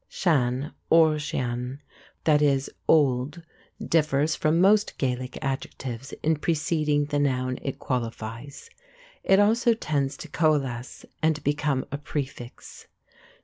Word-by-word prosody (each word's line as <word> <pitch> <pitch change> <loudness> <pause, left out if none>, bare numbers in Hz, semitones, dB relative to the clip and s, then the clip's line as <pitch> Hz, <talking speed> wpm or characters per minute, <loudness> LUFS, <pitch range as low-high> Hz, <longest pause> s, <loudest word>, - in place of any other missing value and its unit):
Sen 140 -4 0 0.2
or 160 -2 +5
sean 125 -2 -3 0.4
(pronounced 150 -2 +4
shan) 140 -2 +4
== 135 - -8 0.2
"old," 145 +1 +2 0.4
differs 155 -1 +1
from 155 +2 +1
most 205 +3 +3
Gaelic 125 -1 -2
adjectives 135 -2 -4
in 160 0 +2
preceding 150 -2 0
the 145 0 -1
noun 130 -2 0
it 135 - -4
qualifies. 120 - -5 0.5
It 195 0 +4
also 225 +3 +4
tends 140 -8 -1
to - - -8
coalesce 140 -6 -1 0.2
and 155 -1 +1
become 145 -2 0
a 140 - -3
prefix. 135 -4 -7
145 Hz, 120 wpm, -26 LUFS, 130-155 Hz, 0.5 s, or